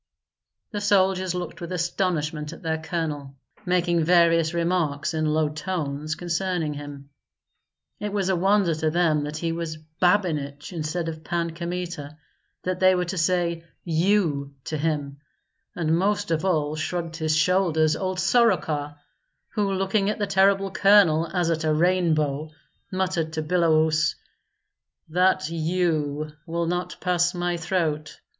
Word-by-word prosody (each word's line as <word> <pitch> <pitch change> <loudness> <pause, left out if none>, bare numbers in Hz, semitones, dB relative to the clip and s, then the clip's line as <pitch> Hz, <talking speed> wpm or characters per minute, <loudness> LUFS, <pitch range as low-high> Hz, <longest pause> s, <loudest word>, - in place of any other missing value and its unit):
The 205 -2 -3
soldiers 190 -2 +2
looked 175 -1 -5
with 170 - -6
astonishment 165 -4 -1
at - - -13
their 160 -1 -1
colonel, 155 -5 -4 0.3
making 175 -2 +2
various 165 -1 +4
remarks, 170 -4 0
in 155 -1 0
low 155 0 +2
tones, 155 -1 -3
concerning 175 -2 -1
him. 145 -1 -9 0.9
It 210 0 -3
was 200 -2 -1
a 190 - +2
wonder 195 -1 +3
to 155 0 0
them 155 -3 +2
that 150 +1 -5
he 165 +1 -2
was 165 -1 -4 0.2
Babinich 160 -6 +1
instead 165 +1 -3
of 160 -1 -6
Pan 170 -1 -1
Kmita, 170 -3 -5 0.5
that 185 0 -2
they 185 0 +5
were 180 0 0
to 185 +2 -4
say 170 -1 +1 0.2
you 160 -5 +1
to 155 - -4
him; 145 -2 -2 0.6
and 160 -2 +1
most 205 +1 0
of 160 0 0
all 155 -5 +1
shrugged 165 +1 -3
his 155 -1 0
shoulders 160 -2 +3
old 185 -1 -2
Soroka, 180 -9 +2 0.5
who, 205 -3 -1
looking 195 +1 +1
at 210 - -1
the 205 - 0
terrible 195 0 +3
colonel 190 -5 +5
as 175 -2 +1
at 160 0 -1
a 155 - +2
rainbow, 155 -3 +1 0.4
muttered 185 -4 -1
to 155 -1 -2
Biloüs, 160 -2 +2 0.9
"That 180 -2 +2
you 155 -3 -1 0.2
will 170 +1 -1
not 175 +1 -2
pass 180 0 +1
my 175 0 -1
throat. 160 -4 -2
170 Hz, 140 wpm, -25 LUFS, 155-185 Hz, 0.9 s, they